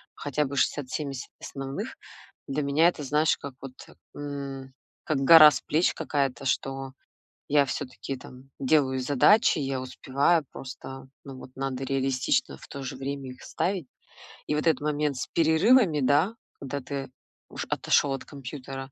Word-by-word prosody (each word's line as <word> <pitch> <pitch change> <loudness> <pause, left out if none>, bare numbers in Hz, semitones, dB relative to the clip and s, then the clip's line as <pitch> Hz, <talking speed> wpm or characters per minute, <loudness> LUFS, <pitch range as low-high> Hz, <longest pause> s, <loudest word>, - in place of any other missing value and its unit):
хотя 145 +1 -1
бы 140 0 -5
60-70 140 -1 -2
основных. 135 0 -6 0.5
Для 140 +2 -1
меня 150 +4 +4
это 150 -4 -6
знаешь, 150 +3 +2
как 140 -2 -8
вот, 135 -2 -8 0.4
м, 140 -2 -6 0.3
как 155 - 0
гора 155 +2 +9
с - - -3
плеч 160 +4 +1
какая-то, 140 -3 -2
что 135 0 -2 0.6
я 145 0 +4
всё-таки 135 0 -5
там 130 +1 -14
делаю 135 -1 +2
задачи, 145 - +4
я 135 -1 -2
успеваю, 140 +5 +1
просто 135 0 -9 0.2
ну 135 -2 -9
вот 130 - -11
надо 135 -1 -3
реалистично 135 - 0
в - - -13
то 140 - -8
же 130 0 -5
время 135 0 -5
их 125 - -12
ставить. 185 -4 -2 0.6
И - - -1
вот 150 - 0
этот 155 -5 +3
момент 150 -2 -1
с - - -3
перерывами, 165 - +4
да, 145 - +3 0.2
когда 140 +1 -4
ты 135 0 -5 0.4
уш - - -5
отошёл 140 - +2
от 135 - -5
компьютера 135 -1 -8
140 Hz, 150 wpm, -27 LUFS, 135-150 Hz, 0.6 s, гора